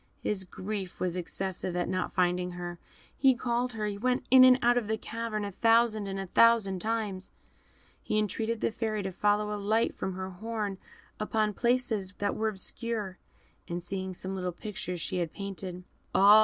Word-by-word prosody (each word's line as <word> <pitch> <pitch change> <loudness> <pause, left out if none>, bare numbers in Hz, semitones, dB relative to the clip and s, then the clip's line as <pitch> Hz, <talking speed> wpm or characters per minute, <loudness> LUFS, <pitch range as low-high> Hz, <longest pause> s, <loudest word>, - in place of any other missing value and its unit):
His 190 -3 -1
grief 190 0 -5
was 180 -1 0
excessive 185 0 -3
at 175 - 0
not 185 -1 -1
finding 180 -1 +1
her; 175 -1 -6 0.4
he 265 -2 +5
called 240 +1 -1
her, 215 -1 -2
he 205 -1 -3
went 250 +2 +1
in 260 0 +10
and 255 0 +8
out 240 +1 +5
of 240 -4 0
the 220 0 0
cavern 225 -2 -3
a 200 - -4
thousand 225 0 +3
and 195 0 -3
a 195 - -3
thousand 210 -1 +4
times, 215 -3 -2 0.7
he 215 - -1
entreated 220 +2 -1
the - - +1
Fairy 215 -2 -2
to 190 - -3
throw 210 +2 +1
a 205 - -4
light 220 +3 +2
from 190 - -3
her 190 0 -4
horn 210 0 -3 0.4
upon 215 0 +1
places 235 -4 0
that 205 0 0
were 220 - 0
obscure, 215 -1 -3 0.5
and 175 0 -4
seeing 190 +1 -4
some 190 +2 -5
little 180 -1 -2
pictures 180 -1 -5
she 185 - -2
had 170 -3 -1
painted 190 -2 -5 0.3
"Ah! 205 +2 +9
205 Hz, 185 wpm, -30 LUFS, 185-225 Hz, 0.7 s, in